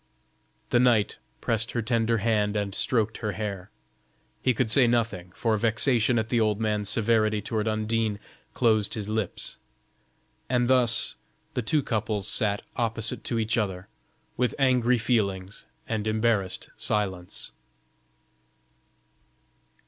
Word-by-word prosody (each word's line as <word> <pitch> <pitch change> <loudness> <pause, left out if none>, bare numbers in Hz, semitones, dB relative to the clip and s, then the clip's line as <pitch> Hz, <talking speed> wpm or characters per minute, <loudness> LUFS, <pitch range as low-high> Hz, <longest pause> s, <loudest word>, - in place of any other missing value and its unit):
The 120 - +4
knight 120 -5 +2 0.2
pressed 115 -1 0
her 120 - -1
tender 115 +1 +1
hand 105 -1 +1
and 100 -2 -2
stroked 110 -1 0
her 105 -3 -2
hair. 100 -3 -5 0.7
He 130 - +3
could 110 -2 +1
say 130 0 +7
nothing, 110 -7 -1
for 115 -2 +1
vexation 115 +2 +2
at 110 0 -1
the 120 - +2
old 105 -1 +1
man's 105 -2 -1
severity 110 -1 +2
toward 110 +1 -2
Undine 110 0 0 0.4
closed 110 -4 +2
his 105 -2 -5
lips: 110 -3 -3 0.9
and 125 -1 +2
thus 125 -2 +3 0.4
the - - -1
two 145 +6 +1
couples 110 -3 -2
sat 105 -3 +1
opposite 115 -2 -2
to 120 - -1
each 115 +1 +1
other, 95 -3 -3 0.5
with 125 -3 0
angry 125 -2 +3
feelings 100 -4 -1 0.2
and 110 -1 -2
embarrassed 110 -4 0
silence. 95 -4 0
110 Hz, 125 wpm, -26 LUFS, 105-115 Hz, 0.9 s, say